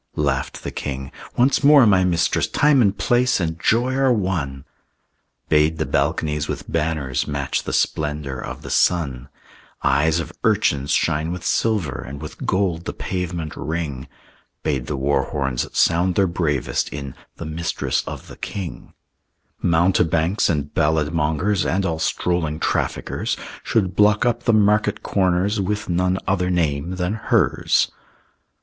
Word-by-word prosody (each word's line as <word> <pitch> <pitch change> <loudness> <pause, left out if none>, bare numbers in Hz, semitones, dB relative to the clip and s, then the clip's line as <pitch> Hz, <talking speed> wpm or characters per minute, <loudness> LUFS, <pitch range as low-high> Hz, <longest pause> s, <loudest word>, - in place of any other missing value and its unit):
Laughed 70 -3 -1
the - - -4
king, 65 -1 -5 0.3
"Once 130 +4 +3
more, 145 -3 +7
my 95 -4 +4
mistress, 85 -2 +1
Time 145 -3 +3
and 100 -3 +2
place 125 -1 +2
and 85 -2 -3
joy 120 +3 +2
are 135 -1 +3
one!" 85 - -1 0.8
Bade 75 +1 +3
the 80 - -1
balconies 75 -1 0
with - - -5
banners 75 -5 -1
Match 70 -2 -1
the - - -5
splendor 75 -3 -1
of - - -7
the - - -7
sun; 70 -8 +1 0.5
Eyes 80 +4 +3
of 85 - -5
urchins 70 0 +1
shine 75 +2 +1
with 90 -1 -6
silver, 105 - 0
And 70 +2 -8
with 75 0 -8
gold 90 -3 0
the - - -4
pavement 85 -5 -4
ring; 75 -5 -4 0.6
Bade 65 -5 -1
the 75 - -2
war 70 0 +1
horns 65 -4 -2
sound 90 +2 +3
their 100 - +4
bravest 85 -6 -1
In 70 -2 -6 0.2
The 85 - -7
Mistress 80 +2 -2
of - - -7
the - - -12
King. 95 -5 -6 0.7
Mountebanks 85 +1 +2
and 75 -3 -1
ballad 75 0 +1
mongers 85 +6 +1
And 95 +1 0
all 80 -3 -1
strolling 80 -2 -1
traffickers - - -1 0.2
Should 95 -6 0
block 105 +2 +4
up 120 0 0
the 120 - +4
market 105 0 +2
corners 95 +2 +1
With 105 +1 -2
none 90 +1 +1
other 90 -1 0
name 85 -1 0
than 90 +2 -1
hers. 110 - +2
85 Hz, 145 wpm, -21 LUFS, 75-95 Hz, 0.8 s, more